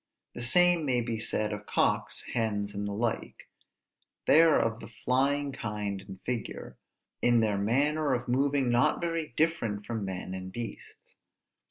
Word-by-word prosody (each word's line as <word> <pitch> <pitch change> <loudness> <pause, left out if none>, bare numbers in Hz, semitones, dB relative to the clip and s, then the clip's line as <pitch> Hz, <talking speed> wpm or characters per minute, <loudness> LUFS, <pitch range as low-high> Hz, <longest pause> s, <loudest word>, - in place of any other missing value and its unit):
The - - -6
same 175 +6 +4
may 125 -4 +1
be 115 -1 -3
said 110 -1 0
of 105 0 -7
cocks, - - +1
hens, 105 -3 -1
and 105 0 -3
the - - -3
like; 110 +3 -3 0.8
they 155 - +7
are 165 -2 +5
of 115 0 -1
the - - -9
flying 135 +5 0
kind 105 -5 -4
in 95 -1 -11
figure; 120 -2 -5 0.4
in 120 -1 +4
their 105 -3 +1
manner 140 +6 +2
of 120 0 -5
moving 135 0 +1
not 135 +6 +3
very 165 -2 -2
different 115 -11 0
from 115 -3 -3
men 95 -1 -5
and 95 0 -6
beasts. 120 +3 -9
120 Hz, 160 wpm, -29 LUFS, 105-140 Hz, 0.8 s, they